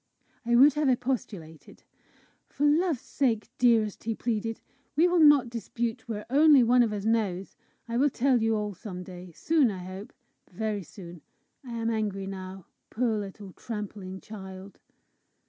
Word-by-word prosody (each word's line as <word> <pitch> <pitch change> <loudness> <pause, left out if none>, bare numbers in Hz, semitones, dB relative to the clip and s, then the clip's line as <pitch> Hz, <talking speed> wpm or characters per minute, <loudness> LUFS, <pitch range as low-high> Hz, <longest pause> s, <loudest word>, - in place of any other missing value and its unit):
I 240 - +3
would 275 +4 +7
have 300 -1 +1
expostulated. 235 - -4 0.7
"For 290 - -1
love's 310 -2 +2
sake, 230 -5 -1
dearest," 225 -5 +2
he 225 -1 -1
pleaded, 225 -1 -2 0.4
"we 330 +4 +5
will 355 -1 +2
not 295 -6 +6
dispute 235 +1 -4
where 210 -2 -4
only 285 0 +6
one 245 +2 +4
of 230 -3 +2
us 205 -1 -4
knows! 205 -5 -1 0.3
I 235 0 -2
will 285 +3 +4
tell 255 -1 +2
you 225 0 +2
all 210 -1 -2
some 180 -1 -8
day 180 -1 -10
soon, 310 -6 +2
I 185 -3 -6
hope, 185 +3 -8 0.4
very 210 +2 -3
soon. 175 -1 -11 0.4
I 245 -3 -8
am 230 0 -1
angry 205 -3 -2
now! 190 -1 -8 0.2
Poor 230 -1 0
little 200 -2 -7
tramping 205 -4 -7
child!" 190 -2 -10
220 Hz, 155 wpm, -27 LUFS, 195-245 Hz, 0.7 s, would